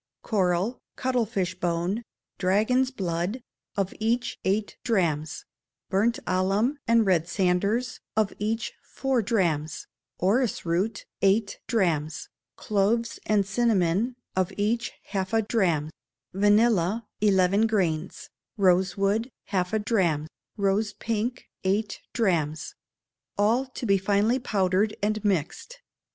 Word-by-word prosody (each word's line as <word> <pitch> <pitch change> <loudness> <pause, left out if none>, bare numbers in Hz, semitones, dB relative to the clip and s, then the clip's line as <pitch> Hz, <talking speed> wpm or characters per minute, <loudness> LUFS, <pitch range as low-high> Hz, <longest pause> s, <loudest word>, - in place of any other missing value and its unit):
Coral, 190 +2 +1 0.2
cuttlefish 225 -8 0
bone, 175 +5 -1 0.4
dragon's 220 +8 +2
blood, 185 -1 -2 0.4
of 195 -1 0
each 235 +3 0
eight 205 +2 0
drachms; 160 -8 0 0.5
burnt 220 +5 +2
alum 195 +9 +1
and 230 -1 +4
red 170 -4 +2
sanders, 200 +7 0 0.2
of 215 -2 +2
each 225 +2 -2
four 265 -3 -1
drachms; 170 -9 0 0.3
orris 220 +5 +1
root, 180 +6 -1 0.2
eight 200 +1 +2
drachms; 165 - 0 0.3
cloves 220 +3 0
and 210 -2 +3
cinnamon, 210 +1 +1 0.2
of 185 +1 +1
each 225 +4 0
half 195 +1 -3
a 225 0 +3
drachm; 175 -9 +1 0.4
vanilla, 205 +1 +3 0.2
eleven 200 +1 +4
grains; 180 -6 -1 0.3
rose 185 -1 +3
wood, 205 +5 +1 0.2
half 180 -3 0
a 220 - +2
drachm; 185 -9 +1 0.3
rose 200 +1 +1
pink, 230 +4 -3 0.2
eight 205 +3 0
drachms. 160 -9 0 0.6
All 230 +6 +2
to 255 -1 -6
be 195 -3 +3
finely 205 +6 +2
powdered 200 -2 +1
and 215 0 0
mixed. 200 - -1
200 Hz, 110 wpm, -26 LUFS, 185-225 Hz, 0.6 s, and